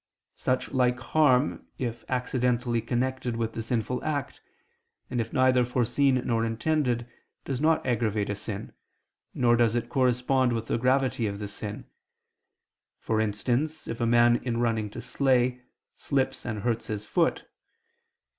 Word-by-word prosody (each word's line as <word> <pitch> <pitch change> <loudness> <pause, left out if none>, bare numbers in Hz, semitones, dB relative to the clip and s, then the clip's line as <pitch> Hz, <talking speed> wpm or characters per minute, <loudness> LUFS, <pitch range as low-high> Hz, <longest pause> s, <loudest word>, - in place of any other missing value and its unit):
Such 130 0 -1
like 125 -1 +2
harm, 135 0 +2
if 120 -3 -4
accidentally 125 -2 0
connected 125 +1 -1
with 115 -1 -2
the 115 - -3
sinful 120 +2 -2
act, 145 -4 -3 0.7
and 120 -2 0
if 115 - -5
neither 130 -1 +4
foreseen 125 +2 +2
nor 115 -1 +1
intended, 120 +1 0 0.4
does 135 -1 -3
not 160 +1 +2
aggravate 110 -4 0
a - - 0
sin, 105 0 -6 0.6
nor 120 -1 +4
does 115 -1 +3
it 120 0 -2
correspond 125 0 +2
with 115 -1 -2
the - - -1
gravity 130 -2 +2
of 100 -1 -4
the 105 0 -5
sin: 105 0 -6 1.1
for 110 -1 0
instance, 125 +9 -1
if 115 +1 -5
a 115 - +2
man 120 0 +5
in 120 -2 -3
running 115 -3 0
to - - -8
slay, 125 -2 +1 0.3
slips 135 -3 -1
and 110 -3 -4
hurts 115 -1 -1
his 105 -1 -4
foot. - - +1
120 Hz, 145 wpm, -27 LUFS, 115-130 Hz, 1.1 s, man